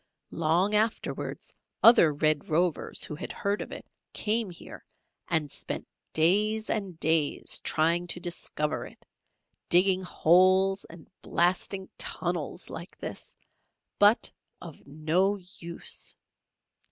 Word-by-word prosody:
Long 170 +6 +1
afterwards, 220 +2 -2 0.3
other 225 -9 +8
Red 155 0 0
Rovers 170 +1 0
who - - -3
had 150 - -6
heard 200 +1 -2
of - - -7
it, - - -8 0.3
came 220 0 +2
here 175 - -11 0.4
and 155 -4 0
spent - - -6 0.2
days 210 +7 +2
and 195 -6 -3
days 160 -3 +1
trying 170 +3 +1
to 175 - -2
discover 165 -3 -3
it; - - -18 0.6
digging 185 +1 +4
holes 185 +2 +3
and 165 -1 -14
blasting 185 +2 0
tunnels - - -3
like - - -9
this, - - -8 0.6
but 205 +3 +5 0.3
of 165 -5 -12
no 160 +7 +1 0.2
use! 170 0 -4
175 Hz, 115 wpm, -28 LUFS, 160-195 Hz, 0.6 s, other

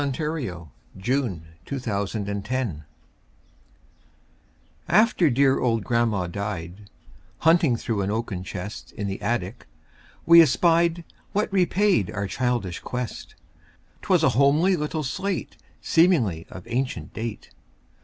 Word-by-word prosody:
Eugene 140 -2 -1 0.9
Field 120 - -1 0.3
Little 130 -6 -3
Homer's 100 -1 -1
Slate 105 - -2 2.1
AFTER 200 -3 +4
dear 135 +1 +3
old 115 -4 +1
grandma 115 -6 +1
died, 100 0 -6 0.5
Hunting 165 -5 +4
through 115 -2 -2
an 95 - -1
oaken 105 -4 -3
chest 95 +3 -7
In 100 - -5
the 100 +1 -4
attic, 105 -3 -3 0.6
we 170 0 +9
espied 170 +3 +3 0.3
What 205 0 -1
repaid 185 - +2
our 100 0 -3
childish 120 -4 -2
quest; 125 -2 -6 0.7
'Twas - - +2
a - - +5
homely 145 - +3
little 155 0 -3
slate, 185 +8 -3 0.3
Seemingly 130 - +2
of 95 - -10
ancient 125 +2 -3
date. 115 -1 -6
120 Hz, 115 wpm, -24 LUFS, 100-155 Hz, 2.1 s, we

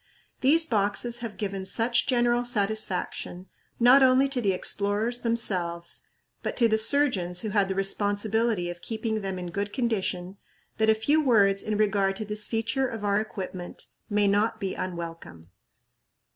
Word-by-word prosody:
These 320 +5 +4
boxes 230 0 0
have 225 -5 -7
given 195 -2 -4
such 230 +5 +1
general 240 -1 +2
satisfaction, 200 -5 -1 0.3
not 250 +3 +6
only 260 +1 +5
to 265 -2 0
the 200 -4 +2
explorers 205 +5 +1
themselves, 180 -7 -2 0.4
but - - -4
to 235 - +5
the 220 0 +2
surgeons 220 -8 +1
who 215 - -4
had 200 -1 +1
the 190 - -2
responsibility 205 +1 +1
of 175 - -11
keeping 220 -1 -3
them 190 -1 -3
in 180 -1 -6
good 200 +3 -3
condition, 195 -6 -2 0.4
that 220 0 +3
a 220 - +5
few 290 +8 +2
words 200 -7 +3
in 215 -1 -2
regard 200 -2 +1
to 215 - -4
this 210 0 -2
feature 230 +4 -1
of 225 -4 -6
our 200 0 +2
equipment 190 -4 -6 0.2
may 205 -1 +2
not 215 +3 +1
be 195 -2 -3
unwelcome. 165 - -7
210 Hz, 160 wpm, -26 LUFS, 195-235 Hz, 0.4 s, not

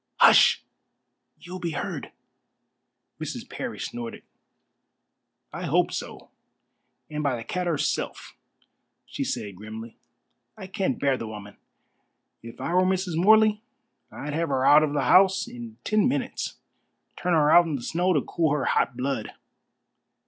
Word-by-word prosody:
"Hush! - - +6 0.7
You 175 - -14
will 185 - -5
be 170 -2 -3
heard." - - -5 1.1
Mrs. - - -6
Parry - - -6
snorted. 120 -1 -6 1.3
"I - - -5
hope - - +2
so, - - -7 0.8
and 150 0 -3
by 140 -4 0
the 115 - -6
cat 180 +9 -3
herself," 155 -4 -2 0.7
she - - -4
said 100 -4 -4
grimly. 110 +3 -9 0.6
"I 200 - -8
can't 190 - -2
bear 140 -2 +1
the 115 - -6
woman. 105 -2 -9 0.9
If 115 0 -11
I 170 - -3
were 180 - +4
Mrs. 185 -2 0
Morley 215 +4 +5 0.5
I'd 150 0 -6
have 165 +1 -1
her 130 -1 +1
out 150 +2 +7
of 150 -2 0
the 145 -2 0
house 190 +5 +4
in 115 -2 -9
ten 215 +3 +2
minutes. 265 -1 -2 0.6
Turn 180 0 -1
her 150 -2 +4
out 175 +1 +7
in 155 - -2
the 125 - -5
snow 180 +6 0
to 150 -6 +2
cool 160 0 0
her 145 -3 -1
hot 125 - +1
blood. 130 -4 -3
150 Hz, 150 wpm, -25 LUFS, 125-185 Hz, 1.3 s, out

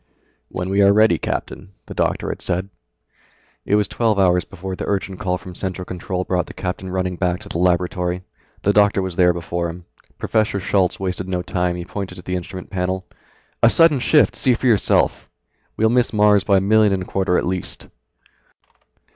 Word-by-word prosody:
"When 90 +1 -4
we 100 +1 +3
are 100 0 +6
ready, 110 +2 +4
Captain," 95 +1 -5
the - - -8
doctor - - -1
had - - -5
said. 90 +2 -1 1.0
It 105 - +2
was 105 -1 +2
twelve 110 -3 0
hours 90 -3 +3
before 95 +2 -7
the - - -6
urgent 95 -2 -2
call 90 -1 -1
from 90 +1 -11
Central 90 0 -4
Control 90 +1 -4
brought 90 -2 -1
the - - -11
captain 95 0 -4
running 90 -1 -2
back 90 -1 0
to - - -10
the 85 - -3
laboratory. 90 0 0 0.4
The 100 - +3
doctor 100 -2 +3
was 95 -2 -4
there 90 -1 +4
before 85 0 -3
him. 85 +1 -9 0.3
Professor 110 -2 0
Schultz 95 -1 +1
wasted 95 -1 -3
no 90 -1 -2
time, 90 0 -1
he 90 -1 -6
pointed 100 0 -6
to 90 - -11
the 90 - -3
instrument 90 +1 -7
panel. 95 0 -2 0.6
"A 115 - +7
sudden 165 0 +4
shift, 150 +4 +3
see 130 -3 +3
for 130 - -5
yourself. 110 -6 +2 0.5
We'll 110 +1 +3
miss 120 0 +2
Mars 105 -2 +4
by 100 -1 +3
a - - +2
million 105 +1 +4
and 95 -1 -1
a - - -9
quarter 95 -1 0
at - - 0
least." 90 0 -3
95 Hz, 195 wpm, -20 LUFS, 90-100 Hz, 1.0 s, A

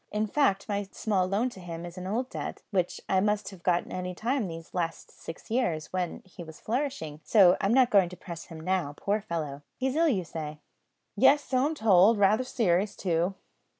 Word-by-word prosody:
In 210 +1 0
fact, 205 -4 +1
my 200 -2 -2
small 195 -4 0
loan 210 +7 0
to 195 - -12
him 170 -1 -7
is 175 0 -9
an 185 0 -6
old 235 +6 -1
debt, - - -6
which 180 -3 -1
I 190 - +3
might 210 +1 0
have 190 -4 -13
got 175 0 +1
any 180 0 -4
time 240 +2 -1
these 165 -1 -9
last 170 -2 -3
six 165 - -10
years, 180 -12 -1
when 180 -2 -3
he 180 -1 -10
was 160 -1 -12
flourishing; 245 - -3
so 190 -3 +6
I'm 195 - +1
not 250 0 +4
going 195 -4 +5
to 180 - -11
press 170 -3 -8
him 165 -2 -10
now, 170 -4 -1
poor 205 +2 0
fellow. 155 -8 -4 0.2
He's 265 +1 -1
ill, 330 +1 +4
you 195 -9 0
say?" 155 -1 -6 0.6
"Yes, 290 0 +5
so 260 +1 +1
I'm 315 - -3
told; 215 -2 +5
raither 205 +4 +4
serious 205 -6 +1
too." 175 +1 0
190 Hz, 205 wpm, -28 LUFS, 175-220 Hz, 0.6 s, so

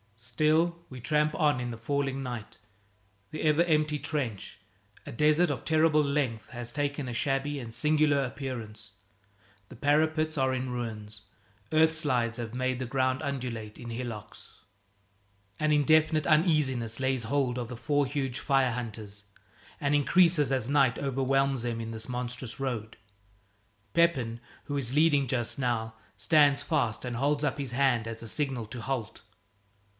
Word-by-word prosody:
Still 160 +8 +1
we 130 - -9
tramp 150 +4 +1
on 145 -4 +2
in 125 -1 -3
the 115 - -6
falling 135 +3 -2
night. 120 -5 -6 0.7
The 155 - -5
ever 155 +2 +4
empty 155 -3 +1
trench 130 -11 -4 0.5
a - - -7
desert 155 +7 +3
of - - -4
terrible 155 -1 +4
length 140 -6 -1
has 120 -2 -5
taken 145 -1 -2
a 120 - -4
shabby 140 +2 -1
and 115 -3 -7
singular 150 +3 +3
appearance. 110 -5 -6 0.8
The - - -11
parapets 155 +3 +1
are 130 0 +2
in 130 0 -3
ruins; 110 -4 -6 0.5
earthslides 155 -7 +2
have 115 -2 -5
made 130 0 -1
the 130 - -2
ground 130 +1 0
undulate 125 -7 -4
in 120 -1 -8
hillocks. 115 -3 -8 1.0
An 155 0 +1
indefinite 155 +1 +3
uneasiness 150 -8 +2
lays 130 -2 0
hold 125 0 0
of 120 - -4
the 125 0 -7
four 145 +4 +1
huge 135 -2 -2
fire 135 -3 +2
hunters, 110 -4 -6 0.5
and 145 0 0
increases 150 0 +4
as 130 -2 0
night 135 -5 +3
overwhelms 135 -1 +1
them 120 -1 -2
in 115 0 -5
this 110 +1 -5
monstrous 125 0 -4
road. 120 -5 -4 1.0
Pepin, 135 -9 +2 0.3
who 145 - -3
is 130 -1 -2
leading 150 -3 +4
just 120 +2 -2
now, 115 -3 -1 0.2
stands 145 -3 +4
fast 110 +1 -1
and 125 -1 -3
holds 145 +3 +1
up 145 0 -1
his 135 -4 -4
hand 120 -3 +2
as 115 0 -6
a - - -6
signal 135 -2 -2
to 120 +2 -7
halt. 125 -3 -4
130 Hz, 150 wpm, -29 LUFS, 120-150 Hz, 1.0 s, ever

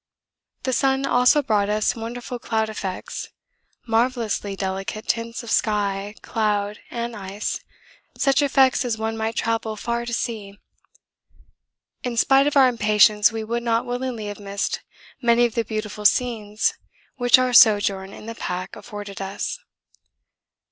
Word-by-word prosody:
The 260 - -1
sun 270 +1 +2
also 250 +3 +4
brought 210 -5 +1
us 210 0 +1
wonderful 240 +2 -6
cloud 220 -1 -1
effects, 195 -3 -5 0.6
marvellously 225 -3 0
delicate 195 +3 -4
tints 230 +1 -2
of 235 - -6
sky, 205 -1 0
cloud, 210 -2 -1
and 235 0 -4
ice, 200 +1 -4 0.6
such 275 +1 +3
effects 270 -2 +3
as 235 -3 -1
one 220 0 -2
might 225 0 -2
travel 225 -1 -1
far 235 +2 -3
to - - -3
see. 210 -4 -4 1.5
In 245 -2 -3
spite 270 +4 +4
of 290 - +1
our 265 -2 +7
impatience 210 -2 +4
we 225 -1 -4
would 235 +2 -2
not 230 -1 0
willingly 245 -3 -3
have 205 0 -6
missed 200 0 -3 0.4
many 235 -1 +4
of 235 - -2
the 230 -2 0
beautiful 215 -1 -5
scenes 215 -2 +2 0.4
which 245 0 +6
our 255 -1 +1
sojourn 205 -5 +5
in 215 - -11
the 230 - -5
pack 185 -4 -5
afforded 205 -2 -8
us. 195 - -4
225 Hz, 140 wpm, -23 LUFS, 205-240 Hz, 1.5 s, our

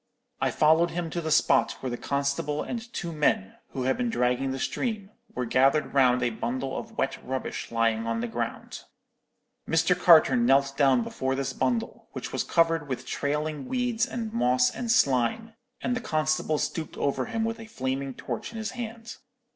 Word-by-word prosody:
"I - - +2
followed 160 +3 +4
him 170 -1 -4
to 170 - -2
the 160 - -3
spot 155 - +3
where 130 - -5
the - - -2
constable 140 +3 -1
and 235 -1 -6
two 175 -7 -4
men, 150 -11 0 0.2
who 130 - -2
had 130 - +1
been 245 -1 0
dragging 125 - +1
the 135 - -2
stream, 210 - -3 0.2
were 125 - -1
gathered 135 +5 +2
round 125 -2 +4
a 120 - +1
bundle 130 +4 -3
of - - -7
wet - - -1
rubbish 130 0 -4
lying 115 -1 +1
on 115 0 -1
the 120 - -2
ground. 115 0 -5 0.8
"Mr. 165 +2 +3
Carter 175 +3 +6
knelt 140 - +3
down 135 -4 +4
before 130 +3 -2
this 135 -1 -2
bundle, 125 -3 -2
which - - -6
was - - 0
covered 165 -2 +2
with 130 -1 -4
trailing 150 0 -2
weeds 245 -1 0
and 225 -4 -5
moss 125 - +3
and 240 - -5
slime, 180 - +2 0.3
and 245 +1 0
the 250 - -3
constable 155 -4 0
stooped 160 +1 -3
over 140 - 0
him 225 -2 -2
with 225 0 -3
a 225 - -9
flaming 135 - -3
torch 120 - -5
in 230 - -8
his 220 -1 -3
hand. 230 -2 -7
150 Hz, 185 wpm, -27 LUFS, 130-215 Hz, 0.8 s, Carter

